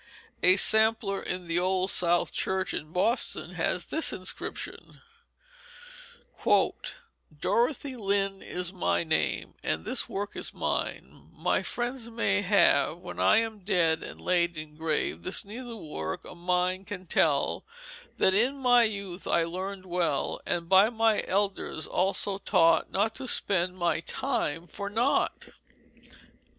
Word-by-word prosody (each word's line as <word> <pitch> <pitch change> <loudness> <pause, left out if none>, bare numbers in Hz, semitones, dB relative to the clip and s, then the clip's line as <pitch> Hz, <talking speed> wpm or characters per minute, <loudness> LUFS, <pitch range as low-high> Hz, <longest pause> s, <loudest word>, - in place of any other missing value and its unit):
A 185 +1 +6
sampler 220 -1 +2
in 180 -1 -4
the 170 +1 +1
Old 185 +1 +1
South 175 0 +2
Church 190 0 -1
in 155 +1 -5
Boston 225 +8 0
has - - 0
this 320 - 0
inscription: 185 0 -5 2.4
"Dorothy 260 - 0
Lynde 195 -3 0
is 180 0 -4
my 180 -2 0
Name 160 -1 0
And 80 +1 -2
this - - -1
Work 200 +1 -4
is - - -4
mine - - -3
My - - +1
Friends 240 -1 -4
may 205 -3 +1
have 175 -6 +3
When 175 - -9
I - - +5
am 225 -2 -5
Dead 180 -5 +2
and - - -9
laid 175 -2 +1
in 155 -1 -8
Grave 160 -1 -1
This 185 - -4
Needlework 205 - -6
of - - -10
mine 180 +1 0
can 190 -2 -7
tell 150 -4 +1 0.5
That 190 - +4
in 245 +8 +2
my 245 -2 +5
youth 200 -4 -5
I 170 - +3
learned 185 +3 -5
well 175 -6 -1
And 170 -1 -1
by 190 +4 +6
my 225 -2 +2
elders 195 -4 -1
also 195 +1 0
taught 165 -5 +3
Not 210 +3 +1
to 265 -1 -5
spend 185 -5 +1
my 170 -3 +1
time 165 0 -2
for 200 +3 -6
naught." 240 +7 0
190 Hz, 135 wpm, -28 LUFS, 175-215 Hz, 2.4 s, A